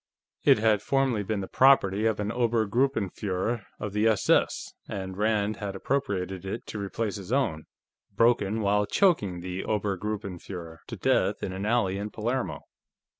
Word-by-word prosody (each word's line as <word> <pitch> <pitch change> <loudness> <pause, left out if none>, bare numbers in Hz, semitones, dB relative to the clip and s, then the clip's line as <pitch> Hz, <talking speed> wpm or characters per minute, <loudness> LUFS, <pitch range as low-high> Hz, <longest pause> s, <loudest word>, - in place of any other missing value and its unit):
It - - +6
had 105 -2 +3
formerly 135 -3 +1
been 105 0 -2
the 95 - -5
property 110 -6 +4
of 110 -2 0
an 105 0 -1
Obergruppenführer 115 -3 0
of 105 -2 -4
the 105 +2 +2
S.S., 110 -2 +2 0.2
and 95 -1 -5
Rand 105 0 +1
had 100 -2 -5
appropriated 95 -7 -2
it 95 +4 -5
to 105 - -6
replace 100 +1 -3
his 100 +2 -8
own, 100 - 0 0.5
broken 110 0 +2
while 105 0 +2
choking 105 - +2
the 90 +1 -4
Obergruppenführer 100 -5 -4
to - - -6
death - - +1
in 95 - -3
an 95 +2 -3
alley 100 -5 +1
in 105 +1 -4
Palermo. 120 +5 -2
105 Hz, 150 wpm, -27 LUFS, 95-115 Hz, 0.5 s, It